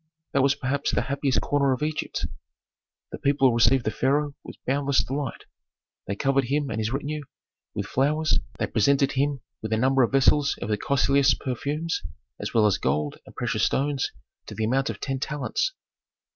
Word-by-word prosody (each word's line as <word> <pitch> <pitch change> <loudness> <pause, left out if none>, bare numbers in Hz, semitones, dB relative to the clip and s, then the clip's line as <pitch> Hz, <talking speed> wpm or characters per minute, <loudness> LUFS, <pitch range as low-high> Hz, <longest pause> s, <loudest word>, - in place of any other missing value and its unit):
That 140 - +3
was 140 +1 +3
perhaps 140 +2 -1
the - - +1
happiest 140 -1 0
corner 140 -2 +2
of 130 - -3
Egypt. 155 0 -2 0.9
The - - -6
people 140 -3 +3
received 115 +2 +4
the 110 - +1
pharaoh 145 +4 +1
with - - -9
boundless 140 +1 +2
delight. 135 -1 -4 0.6
They 100 - -2
covered 135 +4 +1
him 140 +2 -1
and 110 - -2
his 110 +1 -1
retinue 145 +3 -3 0.5
with - - -2
flowers, 150 +4 +1 0.2
they - - 0
presented 140 +5 +2
him 140 0 0 0.2
with 110 - -5
a - - +2
number 130 +3 +3
of 120 - +3
vessels 140 +1 +3
of - - -5
the 105 - +1
costliest 140 +3 +3
perfumes 145 +6 -2 0.4
as - - -4
well 110 -2 +4
as 105 - +2
gold 75 +2 -1
and - - -14
precious - - 0
stones 140 -1 0 0.4
to 105 - -7
the 110 - -2
amount 135 +4 +1
of - - -5
ten 135 -1 -2
talents. 150 - -1
135 Hz, 180 wpm, -25 LUFS, 125-145 Hz, 0.9 s, received